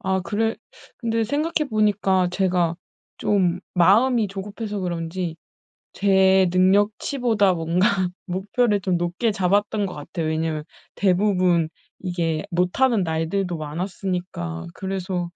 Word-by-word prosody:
아 190 0 0
그래 225 +4 -1 0.4
근데 230 -2 0
생각해 300 +4 -1
보니까 200 -4 +2
제가 180 -3 +1 0.4
좀 180 -3 +1
마음이 215 +5 +4
조급해서 205 +2 -5
그런지 170 -1 -3 0.6
제 190 -1 +4
능력치보다 205 +3 +2
뭔가 170 +3 +1 0.4
목표를 205 +4 0
좀 185 -2 0
높게 175 +6 0
잡았던 205 +2 +1
것 185 - -7
같아요. 155 +2 -5
왜냐하면 160 -1 -1 0.3
대부분 185 -4 +2 0.3
이게 170 -4 -2
못하는 195 +6 +2
날들도 170 +2 -1
많았으니까 160 - -4
그래서 185 -2 -3
190 Hz, 265 characters per minute, -23 LUFS, 175-205 Hz, 0.6 s, 마음이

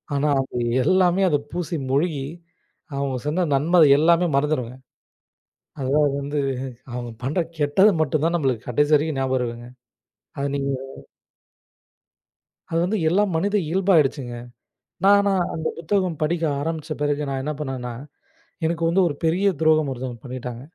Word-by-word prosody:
ஆனா 145 +2 +1
அது 130 -2 -6 0.3
எல்லாமே 185 +2 +3
அது 145 - +3 0.2
பூசி 175 0 -3 0.2
முழுகி, 145 0 0 0.7
அவங்க 140 -1 -2
செந்த 175 +4 +1
நன்மை 170 +6 +3 0.2
எல்லாமே 170 +2 +4
மறந்துறுவோங்க. 130 -4 -1 1.0
அதுதான் 140 +1 +2
வந்து, 145 +1 -2 0.5
அவங்க 120 0 -5
பண்ற 150 +8 -1 0.2
கெட்டது 150 +9 +4
மட்டும்தான் 155 +3 +1
நம்மளுக்கு 130 -7 -1
கடைசி 145 +5 +2
வரைக்கும் 150 -1 0
நியாபகம் 130 -1 0
இருக்குங்க. 120 0 -5 0.7
அது 140 - -1
நீங்க 140 0 -2 2.0
அது 165 - -1
வந்து 205 +3 0
எல்லா 190 +5 +3
மனித 200 +5 0
இயல்பாயிடுச்சுங்க. 155 -9 +2 0.7
நா 195 - +6 0.2
நான் 190 -3 +2
அந்த 160 0 -3
புத்தகம் 180 -1 -1
படிக்க 165 +2 0 0.2
ஆரம்பிச்ச 160 +1 -4
பிறகு 145 0 0
நான் 135 -1 -2
என்ன 150 - -2
பண்ணேன்னா, 130 -4 -4 0.7
எனக்கு 165 0 -1
வந்து 190 +3 +3
ஒரு 145 - -3
பெரிய 175 +5 +2
துரோகம் 155 -2 +3
ஒருத்தங்க 125 -1 -5
பண்ணிட்டாங்க. 125 -2 -6
150 Hz, 135 wpm, -23 LUFS, 135-170 Hz, 2.0 s, நா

